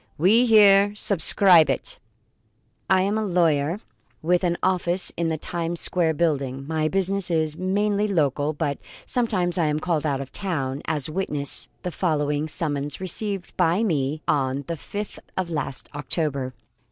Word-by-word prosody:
We 215 +10 +4
here 205 -2 +6
subscribe 185 -4 +5
it: 135 - 0 0.9
I 185 0 +4
am 205 +3 0
a - - -1
lawyer 170 -3 +1 0.4
with 175 +3 +1
an 175 -1 0
office 180 -1 +2
in 170 0 -1
the 160 - -2
Times 170 +1 -3
Square 165 -3 +2
Building. 140 -5 -1
My 155 0 -1
business 195 +2 0
is 160 -2 0
mainly 205 +3 0
local, 150 -5 0
but 145 -2 -3 0.3
sometimes 185 -8 0
I 160 - +2
am 150 0 0
called 160 -2 -1
out 140 -3 -1
of 135 -1 -7
town, 140 -9 -3
as 150 -4 -1
witness 150 -5 -2
the 180 - -3
following 150 -4 -1
summons 145 -2 -2
received 190 +1 -5
by 175 +7 +2
me 150 -6 -1
on 140 -3 0
the 170 - -4
fifth 205 +6 -7 0.2
of 180 -2 -2
last 140 -4 -3
October. 140 -2 -2
165 Hz, 155 wpm, -23 LUFS, 145-190 Hz, 0.9 s, here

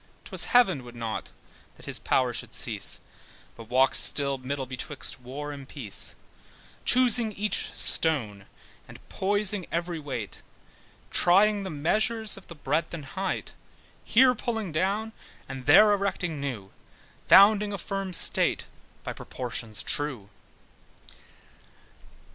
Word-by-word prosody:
'Twas - - +2
heaven 190 - +3
would 120 0 -12
not 115 -2 -5 0.5
that - - -14
his - - -4
power 125 -2 +1
should - - -5
cease, - - +1 0.5
But 115 -1 -12
walk 130 +2 +3
still 140 -2 +3
middle 135 +1 -4
betwixt 130 +1 -3
war 140 +4 -6
and 140 -2 -10
peace: 120 -9 -6 0.7
Choosing 245 -3 +4
each 205 0 -2
stone, 110 -12 -2 0.4
and - - -13
poising 205 -1 0
every 170 0 -2
weight, 130 -8 -6 0.7
Trying 205 +4 +4
the 190 - -5
measures 215 +8 0
of - - -12
the 170 - -10
breadth 160 +2 -2
and 150 -4 -8
height; 190 +5 -4 0.5
Here 255 +2 +5
pulling 225 -5 -4
down, 200 +7 -1 0.4
and 135 -1 -8
there 205 +8 +7
erecting 185 -6 -2
new, 110 -9 -5 0.6
Founding 205 +1 +6
a 200 - -3
firm 195 0 -4
state 175 - +2 0.4
by - - -5
proportions 115 -4 -5
true. 130 -9 -2
160 Hz, 125 wpm, -27 LUFS, 130-205 Hz, 0.7 s, there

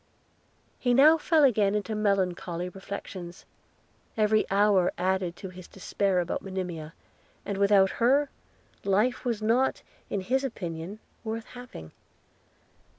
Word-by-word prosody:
He 245 -1 +2
now 310 +5 +7
fell 315 -1 +3
again 210 -6 +3
into 210 +1 -2
melancholy 185 -4 -1
reflections: 185 -2 -8 0.7
every 215 0 +2
hour 195 -2 +3
added 185 -1 0
to 190 - -8
his 180 -1 -11
dispair 195 0 -1
about 175 -1 -2
Monimia, 180 -5 -5 0.5
and 200 -1 -3
without 200 -1 +5
her, 275 +4 +3 0.5
life 210 +7 +1
was 230 -3 -1
not 240 +5 +1 0.3
in 200 - -2
his 260 +8 0
opinion 180 -6 -5 0.3
worth 225 0 -4
having. 245 - -11
200 Hz, 120 wpm, -27 LUFS, 185-230 Hz, 0.7 s, now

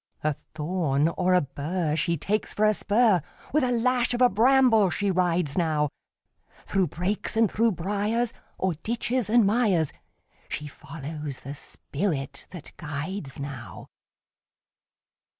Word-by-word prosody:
A 155 0 +2
thorn 150 0 -1
or 180 +2 +2
a 180 - +5
bur 150 +3 -2
She 170 +1 +1
takes 210 +8 -2
for 215 - +3
a 215 - +5
spur; 210 -3 +3 0.3
With 305 -1 +3
a 250 - +1
lash 245 +1 +2
of 240 - -2
a 250 - +7
bramble 235 -3 +5
she 200 +2 0
rides 175 -5 +1
now, 155 -3 +1 0.8
Through 190 -3 +1
brakes 185 +8 -2
and 225 -2 +4
through 230 0 +2
briars, 205 +6 -1 0.3
O'er 190 -1 +1
ditches 235 0 -1
and 235 -1 +5
mires, 200 - +2 0.6
She 150 - -3
follows 150 -1 -7
the 140 - -6
spirit 145 0 -3
that 175 -5 -10
guides 150 +1 -5
now. 140 -4 -7
185 Hz, 135 wpm, -26 LUFS, 150-220 Hz, 0.8 s, a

